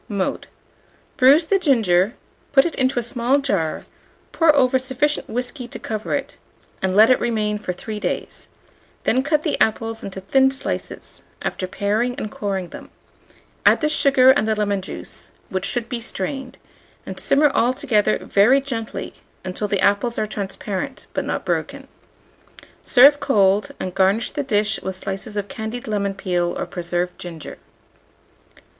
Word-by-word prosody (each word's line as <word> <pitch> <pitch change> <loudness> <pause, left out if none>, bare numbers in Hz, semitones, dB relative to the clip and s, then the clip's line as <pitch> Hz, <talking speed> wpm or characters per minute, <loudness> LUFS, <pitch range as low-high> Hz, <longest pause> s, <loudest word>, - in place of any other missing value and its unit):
Mode. 200 -3 -2 0.7
Bruise 285 +4 +6
the 390 +3 +2
ginger, 220 - +2 0.4
put 270 - +6
it 340 - -1
into 260 -1 0
a 240 - +1
small 240 +3 +1
jar, 200 - -1 0.5
pour 325 -2 +4
over 260 -1 +3
sufficient 260 +3 -1
whiskey 245 +2 -4
to - - -8
cover 215 -1 -3
it, - - -5 0.4
and 190 0 0
let 220 +4 +7
it 255 - +4
remain 215 -3 -1
for 195 - -3
3 210 +4 -6
days; - - -4 0.6
then 255 - +2
cut 300 +2 0
the 305 - -1
apples 225 +1 0
into 195 -1 -6
thin 265 +8 +3
slices, 265 0 -5 0.2
after 185 - -3
paring 215 +6 -1
and 215 - -5
coring 195 -3 -3
them; - - -10 0.7
add - - +5
the 305 - +2
sugar 270 -3 +5
and 265 -5 +1
the 220 - +1
lemon 205 -2 0
juice, 185 - -9 0.2
which 190 0 -2
should 245 -2 -1
he 240 -2 -2
strained; 255 +5 -5 0.5
and - - -7
simmer 290 +1 +3
all 240 -1 +2
together 255 -6 +1
very 230 +8 +4
gently 235 -5 -5 0.3
until 185 +3 -3
the 200 -2 0
apples 230 +4 +2
are - - 0
transparent, 205 +5 -5
but - - -2
not - - -3
broken. - - -3 1.0
Serve 280 +3 +6
cold, 205 -2 +2
and 185 - -4
garnish 195 +4 +2
the 290 - -2
dish 215 -5 0
with 190 0 -4
slices 195 +3 -5
of 205 -1 -2
candied 235 -1 -6
lemon 200 -2 -1
peel 175 -2 -1
or - - -2
preserved 175 0 -3
ginger. 165 -3 -8
220 Hz, 160 wpm, -21 LUFS, 195-265 Hz, 1.0 s, let